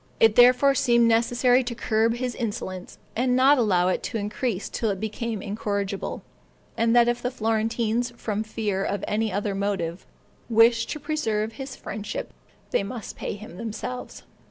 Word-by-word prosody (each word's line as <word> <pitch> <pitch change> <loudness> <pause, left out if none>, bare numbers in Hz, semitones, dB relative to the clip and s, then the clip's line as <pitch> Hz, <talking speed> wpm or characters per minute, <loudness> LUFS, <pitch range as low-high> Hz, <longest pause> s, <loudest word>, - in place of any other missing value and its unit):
It 225 -1 +6
therefore 250 +3 +6
seemed 235 -3 +3
necessary 245 +2 +3
to 240 -1 -4
curb 225 0 +1
his 250 0 -3
insolence, 205 -6 -5 0.2
and 250 +2 +2
not 265 +2 +5
allow 185 -6 +3
it - - 0
to 230 - -3
increase 210 0 -2
till 225 - -2
it 195 -2 -2
became 220 0 -3
incorrigible; 200 -1 -3 0.5
and 230 +1 +2
that 240 -1 +6
if 240 0 0
the 250 - -1
Florentines, 225 +1 0
from 215 -2 -2
fear 215 -3 -2
or 200 - -1
any 215 +1 0
other 205 0 -1
motive, 195 -3 -2 0.4
wished 230 0 +4
to 300 - -4
preserve 225 -8 -1
his 265 +2 -7
friendship, 340 - -6 0.4
they - - +2
must 205 +2 -6
pay - - -4
him 205 -4 -11
themselves. 230 +3 -6
225 Hz, 160 wpm, -25 LUFS, 205-245 Hz, 0.5 s, It